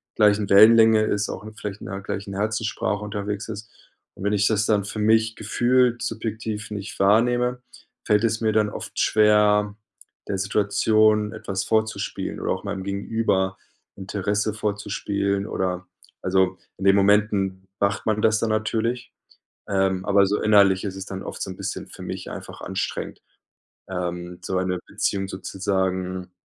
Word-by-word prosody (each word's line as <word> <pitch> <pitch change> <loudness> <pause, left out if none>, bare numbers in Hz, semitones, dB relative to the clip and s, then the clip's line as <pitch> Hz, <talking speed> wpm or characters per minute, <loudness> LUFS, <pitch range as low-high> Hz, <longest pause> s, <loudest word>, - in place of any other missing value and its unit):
gleichen 105 -2 +3
Wellenlänge 110 +1 +7
ist, 105 -1 0
auch 95 - -6
vielleicht 105 0 -6
in - - -8
der 95 - -5
gleichen 100 0 -5
Herzenssprache 105 0 -1
unterwegs 105 0 -4
ist. 110 0 -7 0.5
Und - - -9
wenn 100 - +1
ich 100 0 +3
das 110 -1 +2
dann 105 -3 +2
für 105 - -5
mich 110 +1 +3
gefühlt 120 +2 +2
subjektiv 110 -1 -4
nicht 105 0 -6
wahrnehme, 120 +4 +3 0.4
fällt 105 +1 +3
es 115 -1 +1
mir 110 -1 +1
dann 105 -1 +2
oft - - -8
schwer, 105 -1 +4 0.5
der 100 - -1
Situation 105 +2 +2
etwas 100 -3 -4
vorzuspielen 110 0 -1
oder - - -2
auch 95 - -6
meinem 100 -2 -4
Gegenüber 100 -1 -1 0.4
Interesse 100 +2 -1
vorzuspielen, 100 -1 -2
oder 90 -3 -2 0.4
also, 95 0 +1 0.2
in 95 - -7
den 95 0 +6
Momenten 100 -2 +2
macht 100 0 0
man 110 -1 +1
das 110 0 +4
dann 115 - 0
natürlich, 110 +3 -1 0.5
ähm, 95 -1 0
aber 100 -1 +4
so 100 +2 0
innerlich 100 -3 +5
ist 95 -2 -4
es 95 0 -6
dann 95 -1 -6
oft - - -7
so 95 - -3
'n 90 - -10
bisschen 100 -1 -5
für - - -11
mich - - -6
einfach - - -9
anstrengend, - - -4 0.7
ähm, 90 -1 -4
so 95 +1 -2
eine 90 -1 -1
Beziehung 95 -1 -1
sozusagen 95 -1 -2
105 Hz, 155 wpm, -24 LUFS, 95-110 Hz, 0.7 s, Wellenlänge